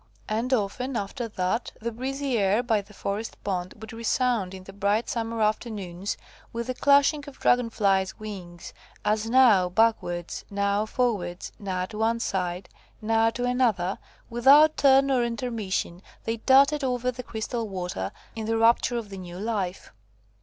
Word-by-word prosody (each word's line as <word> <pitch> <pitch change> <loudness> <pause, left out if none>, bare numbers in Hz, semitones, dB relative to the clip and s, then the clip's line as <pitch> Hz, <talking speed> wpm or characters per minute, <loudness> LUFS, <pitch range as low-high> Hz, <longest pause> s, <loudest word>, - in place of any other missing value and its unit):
And 225 +4 -1
often, 250 +3 -1
after 230 +4 -4
that, 210 +2 -2
the 235 +1 -3
breezy 270 +3 -2
air 205 +2 +2
by 225 -4 +1
the 200 +1 -19
forest 210 +2 -4
pond 185 -2 -3
would 220 +1 -9
resound 230 -4 0
in 185 - -10
the 195 - -11
bright 205 +3 0
summer 230 -1 -2
afternoons, 205 -4 -2 0.3
with 235 0 -4
the 255 - -2
clashing 285 +3 +4
of 285 - -10
Dragon 245 -1 +3
flies' 195 -4 +1
wings, 185 -5 -8 0.3
as, 215 +1 +1
now 230 -8 +5
backwards, 180 -4 0
now 200 +1 0
forwards, 205 -9 -1
now 185 -3 -2
to 215 +2 -8
one 230 +1 +1
side, 180 -4 -2 0.3
now 225 +1 +2
to 245 +2 -3
another, 230 -7 +1 0.3
without 280 +6 +6
turn 275 0 +5
or 250 -2 +3
intermission, 230 -7 -3 0.2
they 225 +1 -2
darted 275 +5 +4
over 250 -1 0
the 250 0 -7
crystal 230 -1 -4
water, 180 - -4 0.2
in 220 -1 -4
the 225 0 +1
rapture 235 +1 +3
of 225 -3 -5
the 195 - -8
new 175 -1 -8
life. 200 -3 -3
220 Hz, 160 wpm, -26 LUFS, 195-245 Hz, 0.3 s, without